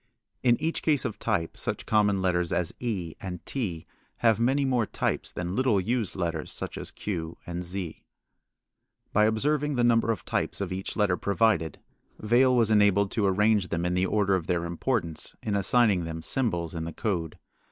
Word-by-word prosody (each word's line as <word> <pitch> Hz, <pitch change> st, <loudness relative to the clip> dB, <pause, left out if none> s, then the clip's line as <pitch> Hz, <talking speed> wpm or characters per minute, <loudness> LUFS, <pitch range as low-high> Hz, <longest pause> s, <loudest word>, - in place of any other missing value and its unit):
In 120 Hz, -2 st, +3 dB
each 160 Hz, +2 st, -1 dB
case 150 Hz, -4 st, +2 dB
of 110 Hz, -, -4 dB
type 80 Hz, -1 st, -1 dB
such -, -, -3 dB
common 105 Hz, -3 st, +2 dB
letters 90 Hz, -2 st, +1 dB
as 85 Hz, -1 st, 0 dB
e 95 Hz, -9 st, -3 dB
and 90 Hz, -3 st, -6 dB
t 95 Hz, -, -3 dB, 0.3 s
have 115 Hz, -2 st, +3 dB
many 135 Hz, +4 st, +2 dB
more 125 Hz, -5 st, +1 dB
types -, -, -1 dB
than 90 Hz, +2 st, -4 dB
little 125 Hz, -5 st, +3 dB
used 115 Hz, +1 st, -1 dB
letters 85 Hz, -4 st, -3 dB
such -, -, -5 dB
as -, -, -4 dB
q 85 Hz, -5 st, -5 dB
and 90 Hz, 0 st, -4 dB
z. 90 Hz, -1 st, -4 dB, 1.1 s
By 105 Hz, 0 st, +5 dB
observing 145 Hz, +6 st, +1 dB
the 120 Hz, -, +2 dB
number 115 Hz, -1 st, +3 dB
of 110 Hz, -4 st, -1 dB
types -, -, -1 dB
of 95 Hz, -2 st, -3 dB
each 95 Hz, +1 st, -5 dB
letter 100 Hz, -5 st, +2 dB
provided, 100 Hz, -6 st, +1 dB, 0.4 s
Vail 125 Hz, +4 st, +3 dB
was 115 Hz, -3 st, +3 dB
enabled 100 Hz, -2 st, +4 dB
to 105 Hz, -3 st, +1 dB
arrange 105 Hz, 0 st, +3 dB
them 85 Hz, 0 st, -2 dB
in 90 Hz, -, 0 dB
the 90 Hz, +1 st, +1 dB
order 100 Hz, -2 st, +2 dB
of 90 Hz, -4 st, 0 dB
their 85 Hz, -1 st, 0 dB
importance 85 Hz, -1 st, -2 dB
in 105 Hz, -, -1 dB
assigning 100 Hz, -1 st, +3 dB
them 80 Hz, 0 st, -6 dB
symbols 85 Hz, -7 st, -1 dB
in 80 Hz, -1 st, -4 dB
the 85 Hz, -, -5 dB
code. 90 Hz, -7 st, -2 dB
100 Hz, 185 wpm, -27 LUFS, 90-115 Hz, 1.1 s, By